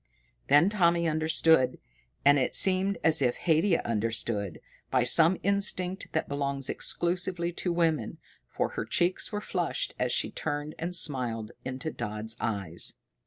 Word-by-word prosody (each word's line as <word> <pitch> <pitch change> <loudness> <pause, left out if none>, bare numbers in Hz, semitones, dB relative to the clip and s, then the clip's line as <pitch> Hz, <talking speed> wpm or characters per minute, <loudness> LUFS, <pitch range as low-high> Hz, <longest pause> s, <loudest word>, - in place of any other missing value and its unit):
Then 150 +5 +5
Tommy 170 -4 +2
understood. 160 -4 +2 0.5
And 145 0 +6
it 130 - -1
seemed 190 0 +3
as 160 -2 +4
if 125 -2 +1
Haidia 165 +2 +1
understood, 110 -3 -1 0.3
by 130 -2 +2
some 165 +8 +5
instinct 195 -2 0
that 160 - -1
belongs 140 -1 -2
exclusively 175 0 -1
to 175 +1 -3
women, 160 -9 0 0.3
for - - -2
her - - -5
cheeks 175 +1 0
were 210 -1 -3
flushed 180 -4 -2
as 125 -1 0
she - - 0
turned 145 0 -4
and 175 +2 -3
smiled 120 -8 +1
into 130 +5 -5
Dodd's 110 -1 -3
eyes. 100 -6 -2
155 Hz, 140 wpm, -28 LUFS, 125-175 Hz, 0.5 s, And